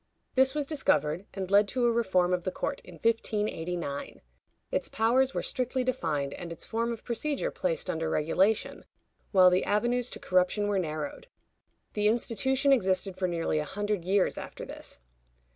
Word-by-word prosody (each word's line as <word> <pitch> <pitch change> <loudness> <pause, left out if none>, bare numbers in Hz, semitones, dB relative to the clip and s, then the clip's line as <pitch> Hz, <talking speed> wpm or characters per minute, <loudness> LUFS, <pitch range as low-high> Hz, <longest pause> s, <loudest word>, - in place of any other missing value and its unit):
This 265 +1 +3
was 295 -1 0
discovered, 180 - 0
and 190 -1 -4
led 200 +1 +6
to 245 +4 0
a 240 - +4
reform 185 -6 +2
of 180 - +1
the 185 - -1
court - - -3
in 180 - -12
1589. 175 -7 -2 0.5
Its - - -1
powers 255 +4 +2
were - - -1
strictly 255 0 -1
defined, 160 - -1
and 175 -2 -7
its 165 - -6
form 230 +1 -1
of 230 - -6
procedure 295 - -2
placed - - -1
under 160 -1 -1
regulation, 185 +9 +1 0.5
while 185 -2 +7
the 180 - +2
avenues 240 +4 +1
to - - -5
corruption 185 +3 +1
were 205 -2 +1
narrowed. 155 - -4 0.7
The 210 0 +1
institution 265 +5 +2
existed 190 -5 +1
for 185 0 -1
nearly 165 -3 0
a - - -1
hundred 205 +3 -2
years 190 +2 +1
after - - -8
this. - - -6
205 Hz, 165 wpm, -29 LUFS, 180-240 Hz, 0.7 s, while